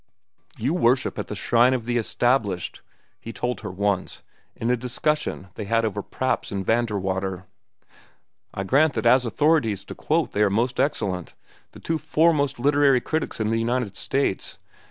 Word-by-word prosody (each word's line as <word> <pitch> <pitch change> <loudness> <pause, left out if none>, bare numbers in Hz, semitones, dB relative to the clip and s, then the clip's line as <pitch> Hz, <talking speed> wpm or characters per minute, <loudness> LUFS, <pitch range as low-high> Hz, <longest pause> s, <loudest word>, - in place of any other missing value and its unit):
"You 130 +8 0
worship 130 -7 +2
at - - -4
the - - -5
shrine 120 +2 +3
of 120 -3 -4
the 120 0 0
established," 115 -5 0 0.4
he 115 - -8
told 125 -2 -3
her - - -6
once, 95 0 -2 0.3
in 115 +2 -1
a - - +4
discussion 125 -3 -2
they 105 - -6
had 115 +2 +1
over 105 -1 -2
Praps 130 +5 -2
and 100 -2 -3
Vanderwater. 95 -5 -1 1.1
"I 95 - -4
grant 140 +9 +3
that - - -2
as 125 +2 +5
authorities 120 - +2
to - - -8
quote 160 +1 0
they 105 - -1
are 105 - +4
most 120 +5 0
excellent—the 100 - -4
two 160 -1 -2
foremost 155 -4 +2
literary 140 0 +4
critics 155 +2 -3
in 110 0 0
the 115 - +1
United 115 -3 -1
States. 135 -5 -2
120 Hz, 160 wpm, -24 LUFS, 100-135 Hz, 1.1 s, as